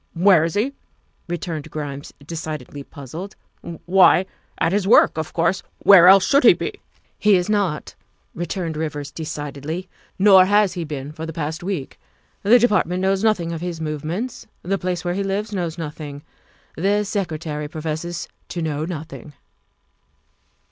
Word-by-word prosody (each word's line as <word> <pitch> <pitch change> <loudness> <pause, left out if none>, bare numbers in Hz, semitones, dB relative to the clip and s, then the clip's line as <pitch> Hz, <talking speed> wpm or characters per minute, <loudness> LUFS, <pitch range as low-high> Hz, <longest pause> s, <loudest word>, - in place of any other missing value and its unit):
" - - -45
Where 185 -6 +7
is 165 0 -2
he?" 240 +7 0 0.5
returned 170 -3 -4
Grimes, 145 -2 -6
decidedly 155 -3 -6
puzzled, 155 +8 -9 0.3
" 170 -1 -9
why, 185 +1 +5 0.3
at - - +1
his 195 0 0
work, 220 - +6
of 160 -1 -4
course. 170 +3 +1 0.2
Where 185 -3 +8
else 190 0 +8
should 280 +2 +3
he - - +9
be?" - - -6 0.4
"He 210 -1 +5
is 180 +2 0
not," 195 -8 -1 0.4
returned 170 -1 -4
Rivers 150 -2 -4
decidedly, 155 +2 -5 0.2
" - - -34
nor 190 -2 +8
has 205 0 +3
he 170 -2 -4
been 145 -2 -6
for 160 +1 -7
the - - -4
past 160 +2 -4
week. 175 -7 -5 0.4
The 220 +5 +6
Department 190 -6 +1
knows 195 +1 +1
nothing 190 -7 +1
of 165 -1 -5
his 175 -2 -4
movements; 160 - -4 0.2
the 195 +2 -1
place 180 -1 -3
where 175 - 0
he 195 - -2
lives 205 +2 -2
knows 170 -4 -3
nothing; 150 -2 -7 0.5
the 200 +5 +1
Secretary 160 -7 -3
professes 160 +2 -4 0.2
to 175 - -5
know 155 -1 -2
nothing. 160 -3 -8
170 Hz, 160 wpm, -21 LUFS, 155-195 Hz, 0.5 s, he